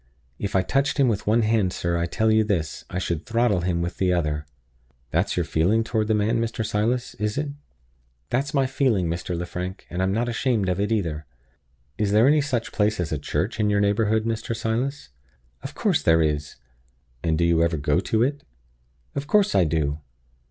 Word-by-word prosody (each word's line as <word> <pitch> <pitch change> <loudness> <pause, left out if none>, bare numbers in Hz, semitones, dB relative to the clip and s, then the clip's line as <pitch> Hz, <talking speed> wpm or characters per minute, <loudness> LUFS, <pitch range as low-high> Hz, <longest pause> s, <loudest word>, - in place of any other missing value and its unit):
If 100 - -3
I 95 - +4
touched 135 +8 0
him 135 -2 +4
with 105 -2 -2
one 115 +2 +3
hand, 110 -4 +2
sir, 85 -1 -2
I 85 0 0
tell 110 +5 +1
you 110 0 +4
this, 95 -7 -2
I 90 - -4
should 85 -3 -2
throttle 115 -5 +1
him 85 -1 0
with 85 - -4
the 95 -1 +2
other." 75 -4 -1 0.6
"That's - - 0
your - - +2
feeling 100 +8 +2
toward 110 -1 -1
the 110 - +2
man, 110 +3 +1
Mr. 115 -1 -2
Silas, 115 +3 -1
is 105 +2 -1
it?" 150 0 -1 0.8
"That's 140 +3 0
my 135 -3 +2
feeling, 130 -9 +1
Mr. 85 +1 -3
Lefrank; 90 +2 -5
and 90 - -2
I'm 95 +1 +1
not 115 +4 0
ashamed 115 -4 0
of 90 +1 -1
it 105 +2 0
either." 80 -9 -1 0.7
"Is 105 -1 +1
there 110 +4 +5
any 150 +1 +5
such 125 -5 -2
place 105 0 +1
as 90 -1 -2
a 75 - -1
church 75 - -2
in 105 -1 +2
your 100 0 +2
neighborhood, 105 +2 +2
Mr. 115 0 -2
Silas?" 115 - -2 0.5
"Of - - -8
course - - +1
there 80 -1 +4
is." 75 -1 -2 0.7
"And 80 -2 0
do 85 - +2
you 85 -1 +3
ever 85 -1 +1
go 75 +3 +1
to 110 +4 +1
it?" 145 +3 -1 0.7
"Of 140 +1 -4
course 205 +2 +3
I 90 - +4
do." 75 -2 -1
105 Hz, 200 wpm, -24 LUFS, 85-115 Hz, 0.8 s, there